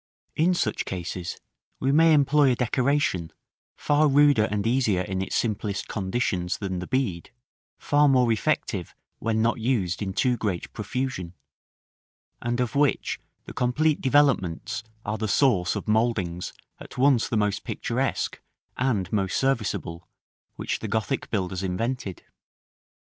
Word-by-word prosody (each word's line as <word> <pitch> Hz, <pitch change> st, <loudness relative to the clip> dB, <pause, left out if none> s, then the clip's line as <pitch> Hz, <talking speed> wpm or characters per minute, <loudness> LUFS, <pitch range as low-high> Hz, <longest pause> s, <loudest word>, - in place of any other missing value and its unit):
In 175 Hz, +4 st, +3 dB
such 110 Hz, -10 st, -1 dB
cases 90 Hz, -1 st, -5 dB, 0.4 s
we 135 Hz, -, +1 dB
may 160 Hz, +2 st, +6 dB
employ 145 Hz, -1 st, +4 dB
a -, -, +2 dB
decoration, 125 Hz, -, 0 dB, 0.4 s
far 150 Hz, +1 st, +2 dB
ruder 145 Hz, -5 st, +5 dB
and 105 Hz, -1 st, -2 dB
easier 115 Hz, -6 st, +2 dB
in 95 Hz, 0 st, -3 dB
its 95 Hz, -, -3 dB
simplest 105 Hz, -3 st, -1 dB
conditions 95 Hz, -3 st, -1 dB
than 95 Hz, -3 st, -3 dB
the 90 Hz, -, -6 dB
bead, 115 Hz, -10 st, -1 dB, 0.5 s
far 145 Hz, 0 st, +3 dB
more 125 Hz, -3 st, +4 dB
effective 110 Hz, -, -1 dB, 0.2 s
when 110 Hz, 0 st, 0 dB
not 115 Hz, +1 st, +1 dB
used 110 Hz, -7 st, 0 dB
in 100 Hz, -2 st, -2 dB
too 125 Hz, +4 st, +1 dB
great 95 Hz, -7 st, -3 dB
profusion; 105 Hz, -5 st, -4 dB, 1.1 s
and 120 Hz, +1 st, -1 dB
of 125 Hz, -2 st, -1 dB
which 145 Hz, -1 st, +1 dB, 0.3 s
the -, -, -9 dB
complete 145 Hz, +5 st, +1 dB
developments 120 Hz, -, +2 dB, 0.2 s
are 105 Hz, +1 st, -2 dB
the 110 Hz, -, -1 dB
source 100 Hz, -6 st, +2 dB
of -, -, -5 dB
mouldings 105 Hz, -6 st, 0 dB, 0.3 s
at -, -, -11 dB
once 130 Hz, -2 st, +3 dB
the 115 Hz, -, 0 dB
most 105 Hz, -1 st, 0 dB
picturesque -, -, -2 dB, 0.4 s
and 110 Hz, -8 st, 0 dB
most 95 Hz, -3 st, 0 dB
serviceable 105 Hz, -10 st, -1 dB, 0.5 s
which -, -, -3 dB
the 110 Hz, -, -5 dB
Gothic 110 Hz, +6 st, -2 dB
builders 95 Hz, -3 st, -2 dB
invented. 95 Hz, +1 st, -3 dB
115 Hz, 140 wpm, -25 LUFS, 95-130 Hz, 1.1 s, may